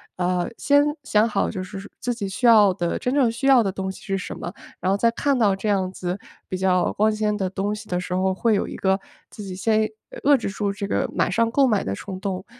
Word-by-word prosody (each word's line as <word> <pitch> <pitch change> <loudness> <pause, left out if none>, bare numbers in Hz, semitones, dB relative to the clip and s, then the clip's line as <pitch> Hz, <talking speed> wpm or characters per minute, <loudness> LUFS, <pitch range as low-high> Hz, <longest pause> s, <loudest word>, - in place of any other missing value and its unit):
呃， 180 0 0
先 285 0 +4 0.2
想 215 -4 +3
好 205 -3 0
就 185 - -4
是 195 +1 -8
自 245 - -1
己 205 -5 -4
需 245 - -3
要 210 -5 +7
的 175 -1 -2
真 250 - -2
正 270 -5 +3
需 240 +4 -2
要 265 -3 +7
的 200 - 0
东 190 -1 -3
西 - - -12
是 195 -1 -2
什 - - -6
么， 175 - -5 0.3
然 185 - -1
后 195 - +3
再 230 +3 +2
看 275 +2 0
到 210 -4 +3
这 195 +3 -4
样 190 -3 +1
子 180 0 -4 0.3
比 185 - -3
较 185 -1 +2
光 215 +1 +2
鲜 210 0 0
的 190 -3 -1
东 200 +2 -2
西 215 0 -11
的 180 0 0
时 180 0 -5
候 190 +1 +1
会 220 +3 +2
有 - - 0
一 - - -7
个 190 0 +2 0.3
自 210 - -9
己 190 - -6
先 215 +2 +2 0.3
遏 285 -1 +6
制 230 - -4
住 205 0 -2
这 200 0 -4
个 - - 0
马 - - +1
上 230 0 +1
购 270 +1 +4
买 210 -4 +1
的 95 - -3
冲 185 - -6
动， 190 -2 -3
200 Hz, 275 characters per minute, -23 LUFS, 190-225 Hz, 0.3 s, 要